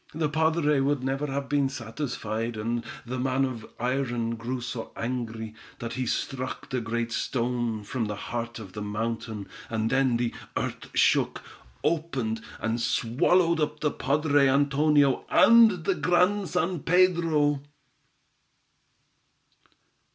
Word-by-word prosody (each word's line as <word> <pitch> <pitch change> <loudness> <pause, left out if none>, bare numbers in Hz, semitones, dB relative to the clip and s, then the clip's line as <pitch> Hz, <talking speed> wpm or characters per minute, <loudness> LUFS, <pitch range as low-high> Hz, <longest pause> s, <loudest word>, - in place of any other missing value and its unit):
"The 155 -2 0
padre 155 -1 +2
would 140 -1 +1
never 135 +1 -1
be 140 0 +1
satisfied, 115 -3 -4
and 115 +2 -2 0.2
the 125 +1 -4
man 130 +1 +1
of 120 -4 -6
iron 120 -2 -1
grew 120 +3 -4
so 120 -1 -5
angry, 115 -2 -4 0.2
that 115 0 -5
he 130 0 -2
struck 130 +1 -3
the 130 -2 0
great 115 0 -2
stone 120 -2 -1
from 115 +3 -2
the 105 -1 -3
heart 115 +2 -4
of 100 -5 -10
the 105 - -6
mountain, 110 0 -3 0.2
and 110 0 -1
then 135 -3 +3
the 120 -1 -1 0.2
earth - - -4
shook, - - +3 0.4
opened, 135 -9 -1 0.2
and 115 +1 -1
swallowed 165 +10 +2
up 150 -1 -1
the 150 - +1
padre 145 0 +2
Antonio 140 0 +3
and 225 -7 +6
the 195 - +3
Grand 180 +5 +2
San 180 -1 0
Pedro." 165 -5 +3
130 Hz, 130 wpm, -27 LUFS, 115-150 Hz, 0.4 s, and